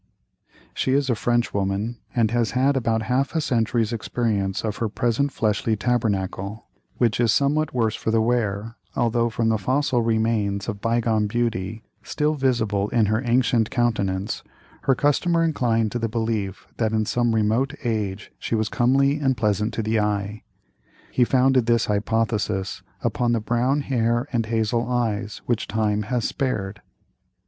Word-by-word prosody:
She 130 - 0
is 140 -1 +2
a - - +2
Frenchwoman, 110 -1 -1 0.2
and 115 -3 +2
has 120 -1 +1
had 135 +2 +3
about 115 -3 0
half 130 +7 0
a - - +3
century's 115 -4 0
experience 105 -4 -1
of 105 -1 -2
her 115 - -1
present 120 +6 0
fleshly 110 -1 0
tabernacle, 100 -2 -1 0.3
which 115 -3 +1
is 120 -3 +4
somewhat 145 +5 +2
the - - -23
worse 110 -2 +2
for 110 0 0
wear, 110 -2 -1 0.2
although 120 0 +1
from 115 0 0
the 110 -1 +1
fossil 130 +3 +1
remains 110 -3 0
of 105 -3 -4
bygone 115 -2 +1
beauty, 110 -2 -2 0.2
still 150 +1 0
visible 110 -8 0
in 115 -3 +3
her 110 +2 +1
ancient 120 -2 +2
countenance, 100 -5 -1 0.4
her 135 - +4
customer 165 +5 +2
inclined 115 -9 +1
to 120 - -2
the 115 -1 -1
belief 110 -4 -2
that 110 -1 0
in 110 -1 +1
some 120 0 +1
remote 115 +6 +1
age 105 -4 -2
she - - -2
was 110 -1 0
comely 135 +4 +2
and 135 -3 +1
pleasant 105 0 +1
to 115 - -1
the 110 +1 +1
eye. 105 0 -1 0.7
He 125 - +3
founded 130 -1 +3
this 115 -1 +3
hypothesis 105 -2 -1 0.2
upon 120 -1 +1
the 115 - +2
brown 120 +6 +1
hair 120 -1 0
and 115 -2 0
hazel 115 +1 0
eyes 110 -4 -2
which 120 -2 -1
time 105 -1 0
has 125 -2 0
spared. 105 -7 -3
115 Hz, 155 wpm, -23 LUFS, 105-120 Hz, 0.7 s, is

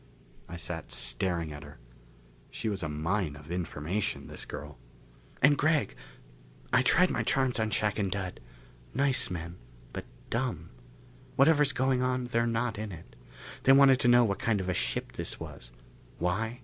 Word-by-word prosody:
I 85 - -6
sat 85 -1 -5
staring 80 +6 -1
at 75 - -8
her. 75 0 -12 0.7
She 110 - -3
was 100 -3 -2
a 80 - -2
mine 80 +2 -1
of 75 +2 -11
information, 90 +2 -2
this - - -5
girl. 75 0 -8 0.6
"And 145 +1 +7
Gregg, 155 +1 +2 0.8
I - - +6
tried - - +4
my - - 0
charms 130 -3 +1
on 110 -1 +1
Shac 105 0 +1
and 100 -2 +1
Dud. 95 -1 -4 0.6
Nice 135 0 +2
men, 85 -1 -5 0.4
but - - -5 0.3
dumb. 115 -10 -2 0.6
Whatever's 145 0 +5
going 130 0 +1
on, 125 0 0
they're 115 -1 +1
not 115 -1 -1
in 110 -1 -4
it. 85 -3 -11 0.5
They 135 - +6
wanted 135 -1 +7
to 125 - +2
know 120 0 +7
what 100 -4 0
kind 110 -3 +1
of 95 -1 -3
a - - +1
ship - - -2
this - - -5
was. - - -9 0.5
Why? 110 +8 -1
105 Hz, 165 wpm, -30 LUFS, 85-125 Hz, 0.8 s, And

